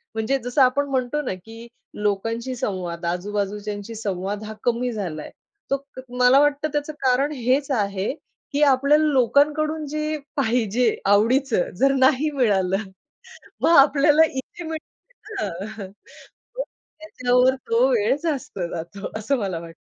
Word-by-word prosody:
म्हणजे 225 +5 0
जसं 245 +3 +1
आपण 265 +2 +3
म्हणतो 260 +2 -1
ना 250 - -2
की 225 +1 -11 0.3
लोकांशी 225 +5 -1
संवाद 180 -7 -4
आजूबाजूच्यांशी 205 +4 -3
संवाद 200 -1 -3
हा 215 - -6
कमी 245 +1 0
झालाय. 175 -8 -5 0.4
तो 275 0 0 0.4
मला 250 +2 +6
वाटतं 290 +1 +2
त्याचं 295 +1 -2
कारण 265 +2 +2
हेच 260 +3 +1
आहे 200 -3 -1 0.4
की 285 - 0
आपल्याला 280 +4 +3
लोकांकडून 300 +4 +2
जे 305 +1 -2 0.2
पाहिजे 240 -2 +1
आवडीचं 225 +3 +3
जर 275 0 +4
नाही 265 +3 +4
मिळालं 195 -9 +2 0.8
मग 335 - +5
आपल्याला 295 +2 +6
इथे 270 +4 -7
मिळतं 410 +6 -7
ना. 200 +4 -7 0.7
मग - - 0 0.4
त्याच्यावर 250 -3 +2
तो 465 +2 +3
वेळ 435 - +2
जास्त 290 - -3
जातो 185 +5 -6
असं 270 +6 0
मला 190 -5 -2
वाटतं. 165 0 -11
250 Hz, 130 wpm, -23 LUFS, 205-285 Hz, 0.8 s, मला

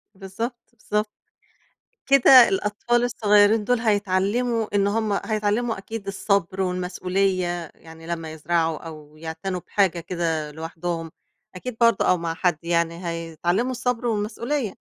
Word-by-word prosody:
بالضبط، 205 +6 -5 0.2
بالضبط. 210 -1 -2 1.0
كده 265 -2 +8
الأطفال 210 +5 0
الصغيرين 210 -2 +4
دُول 245 +2 +1
هيتعلموا 215 +2 0
إن 200 0 +3
هُم 210 -1 0
هيتعلموا 215 +1 0
أكيد 200 +1 -7
الصبر 195 -1 0
والمسؤولية، 180 -1 -1
يعني 165 0 -14
لمّا 165 -2 -4
يزرعوا 160 0 0
أو 155 -2 -11
يعتنوا 165 +3 -4
بحاجة 190 -4 +1
كده 165 -3 -2
لوحدهم، 165 +1 -5 0.4
أكيد 230 +5 -6
برضه 230 -3 +4
أو 180 - +4
مع 165 -1 -3
حد 175 -2 +1
يعني 170 +1 -1
هيتعلموا 170 +8 -1
الصبر 250 -1 -2
والمسؤولية. 225 +3 -2
195 Hz, 120 wpm, -23 LUFS, 170-220 Hz, 1.0 s, كده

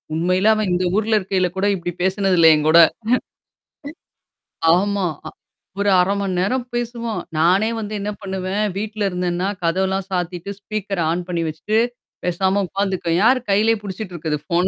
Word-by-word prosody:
உண்மையிலே 185 +5 +2
அவன் 215 -3 -1
இந்த 180 +1 0
ஊர்ல 220 +1 +1
இருக்கையில 185 -1 0
கூட 195 - +1
இப்படி 175 -1 -4
பேசினது 190 -1 +1
இல்லை 160 -1 +8
என்கூட. 155 +2 +4 2.0
ஆமா. 200 0 0 0.2
அ - - -5 0.5
ஒரு 205 - +2
1/2 190 +3 +2
மணி 190 -2 -2
நேரம் 245 +7 0
பேசுவோம். 235 -1 -3 0.2
நானே 190 +7 +3
வந்து 215 0 -5
என்ன 205 - -3
பண்ணுவேன், 190 +1 -2
வீட்ல 215 0 -3
இருந்தேனா 180 +1 -1 0.2
கதவெல்லாம் 190 +3 0
சாத்திட்டு 180 +1 -3
ஸ்பீக்கர் 200 -3 -3
ஆன் 175 +1 -2
பண்ணி 170 -1 -1
வச்சுட்டு 160 +8 -2 0.5
பேசாம 190 +3 +1
உட்கார்ந்துக்குவேன். 190 -3 -1
யாரு 255 +1 +5
கையிலேயே 220 +3 +3
பிடிச்சிட்டு 190 -1 -6
இருக்கறது 150 -2 -2
ஃபோன? 175 +2 +1
190 Hz, 145 wpm, -20 LUFS, 175-205 Hz, 2.0 s, இல்லை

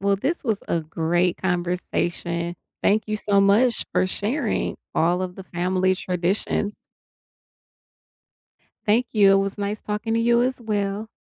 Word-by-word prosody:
Well 200 0 +2
this 280 - -2
was 220 -5 -1
a 170 - +1
great 170 +3 0
conversation, 175 -1 -2 0.3
thank 215 +2 +3
you 215 - -1
so 205 -2 +2
much 220 +4 +3
for - - +2
sharing 215 +10 -1 0.2
all 175 +3 +2
of 180 -1 -5
the 190 - -8
family 185 +1 +1
traditions. 185 +3 -1 2.1
Thank 230 +4 +3
you, 200 -3 +6
it - - +6
was 195 +1 0
nice 205 +1 -2
talking 210 +2 -2
to 230 - +2
you 235 +1 +4
as 255 0 -1
well. 210 -1 -2
200 Hz, 145 wpm, -23 LUFS, 180-215 Hz, 2.1 s, you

